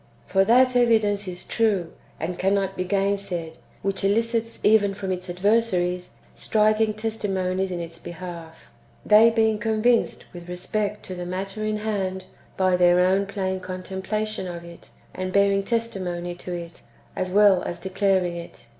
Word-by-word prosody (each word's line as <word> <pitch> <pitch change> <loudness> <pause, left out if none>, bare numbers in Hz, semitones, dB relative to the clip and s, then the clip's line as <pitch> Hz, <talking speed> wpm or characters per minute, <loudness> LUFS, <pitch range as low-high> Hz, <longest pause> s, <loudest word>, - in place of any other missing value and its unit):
For 195 0 +3
that 250 +3 +5
evidence 215 -4 +3
is 180 -1 -5
true, 205 -7 0 0.3
and 175 +2 -4
cannot 195 0 +1
be 185 - -1
gainsaid, 195 -4 -1 0.3
wdiich 195 -1 -1
elicits 230 +3 0
even 205 -2 +4
from 195 -1 -4
its 180 0 -4
adversaries 180 -2 0 0.2
striking^ 215 0 +2
testimonies 190 -4 -1
in 180 -1 -4
its 165 -1 -7
behalf; 170 -2 -9 0.3
they 215 +2 +7
being 220 -2 +2
convinced 225 +2 +1
with 175 0 -10
respect 205 +4 -3
to 185 - -7
the 180 -1 -5
matter 195 +3 -4
in 215 0 -1
hand 195 -3 -3 0.3
by 185 -1 +3
their 180 0 +5
own 190 +2 +3
plain 190 -1 -2
contempla 190 +3 -4
tion 215 -3 -4
of 170 -1 -7
it, 170 0 -13 0.2
and 185 0 -4
bearing 200 0 +4
testimony 190 -6 -2
to 180 +1 -8
it, 170 -1 -7 0.3
as 185 - -2
well 200 -1 +5
as 175 - -5
declaring 190 -2 +1
it.' 170 -7 -10
195 Hz, 155 wpm, -24 LUFS, 180-215 Hz, 0.3 s, they